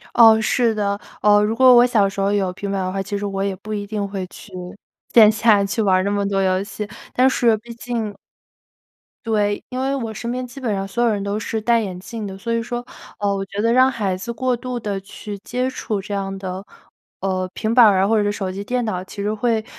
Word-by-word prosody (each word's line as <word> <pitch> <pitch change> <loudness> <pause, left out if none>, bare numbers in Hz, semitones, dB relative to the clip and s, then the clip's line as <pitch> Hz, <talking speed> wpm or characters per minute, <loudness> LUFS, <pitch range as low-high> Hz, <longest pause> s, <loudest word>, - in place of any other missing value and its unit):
哦， 225 -2 +8
是 230 +1 +2
的， 200 -1 -1 0.2
哦， 205 0 +5
如 215 +2 0
果 255 +1 +7
我 240 +1 +7
小 220 -5 +3
时 195 0 -6
候 195 - +2
有 195 -3 +1
平 200 +1 -5
板 195 - -1
的 185 - -2
话， 195 +1 -2
其 200 +1 -3
实 205 - -4
我 195 -1 -2
也 195 -1 -1
不 215 +3 -7
一 205 -1 -3
定 205 -1 -3
会 195 -2 -4
去 200 - -14 0.6
线 215 -2 +8
下 215 -2 +4
去 200 +3 -1
玩 195 -3 +3
儿 185 - +1
那 200 - 0
么 200 -1 0
多 195 -1 0
游 185 0 +1
戏， 210 0 -6 0.3
但 255 +1 +4
是 235 -3 +3
毕 235 +2 -11
竟 230 -3 -3 1.1
对， 205 -2 0
因 255 -1 -4
为 270 +1 0
我 230 -4 -4
身 235 +3 -4
边 255 +1 -3
基 265 +3 -11
本 230 -5 -1
上 195 0 -2
所 235 +5 -1
有 235 - +4
人 205 -2 -1
都 200 +1 -2
是 220 +1 -3
戴 235 +1 +3
眼 185 -4 -5
镜 220 +3 -6
的， 190 -1 -7
所 230 +3 -3
以 230 0 0
说， 240 +1 -5 0.3
呃， 205 -1 +1
我 195 - -2
觉 200 +2 -4
得 230 +1 +2
让 260 +1 +5
孩 205 -6 -1
子 190 +6 -5
过 250 +2 0
度 245 +1 -5
地 205 -3 -3
去 205 +1 -8
接 250 +5 -2
触 215 -5 -3
这 205 +1 -7
样 195 -1 -3
的 190 0 -6 0.5
呃， 185 -1 -1
平 220 +1 -1
板 245 -3 +9
儿 195 -3 +5
啊 195 - +3
或 225 - +2
者 210 - +2
是 205 - +1
手 195 -2 -3
机 195 +2 -5
电 245 +2 -1
脑， 185 -4 -2
其 200 +2 -8
实 210 +1 -1
会 220 0 0
210 Hz, 275 characters per minute, -21 LUFS, 195-235 Hz, 1.1 s, 板